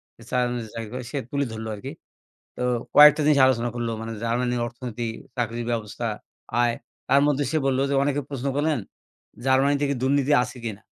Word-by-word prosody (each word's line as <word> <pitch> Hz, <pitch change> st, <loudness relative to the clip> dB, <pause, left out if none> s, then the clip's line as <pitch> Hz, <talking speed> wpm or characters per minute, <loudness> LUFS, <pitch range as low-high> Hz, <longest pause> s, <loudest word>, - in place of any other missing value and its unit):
সে -, -, -20 dB
জার্মানিতে 120 Hz, -2 st, -1 dB
চাকরি 115 Hz, -2 st, -5 dB
করে, 125 Hz, 0 st, -4 dB
সে 145 Hz, -, -3 dB
তুলে 140 Hz, 0 st, 0 dB
ধরলো 110 Hz, 0 st, -5 dB
আরকি। 130 Hz, +7 st, -7 dB, 0.7 s
তো -, -, -5 dB, 0.3 s
কয়েকটা 150 Hz, +1 st, +9 dB
জিনিস 150 Hz, -2 st, +5 dB
আলোচনা 120 Hz, -2 st, +1 dB
করলো। 120 Hz, -1 st, -2 dB
মানে 115 Hz, 0 st, -5 dB
জার্মানির 120 Hz, +1 st, 0 dB
অর্থনীতি, 120 Hz, -1 st, -5 dB, 0.3 s
চাকরির 120 Hz, 0 st, -2 dB
ব্যবস্থা, 115 Hz, +1 st, -3 dB, 0.5 s
আয়। 120 Hz, -1 st, +2 dB, 0.4 s
তার 140 Hz, +2 st, +5 dB
মধ্যে 145 Hz, -1 st, +1 dB
সে 160 Hz, -, +1 dB
বললো 135 Hz, 0 st, +1 dB
যে -, -, +2 dB
অনেকে 145 Hz, 0 st, 0 dB
প্রশ্ন 140 Hz, -1 st, -4 dB
করলেন 150 Hz, -1 st, +1 dB, 0.7 s
জার্মানিতে 140 Hz, +2 st, +3 dB
কি 140 Hz, -, 0 dB
দুর্নীতি 140 Hz, +1 st, +2 dB
আছে 125 Hz, +1 st, -8 dB
কিনা? 110 Hz, -2 st, -5 dB
125 Hz, 175 wpm, -24 LUFS, 115-140 Hz, 0.7 s, কয়েকটা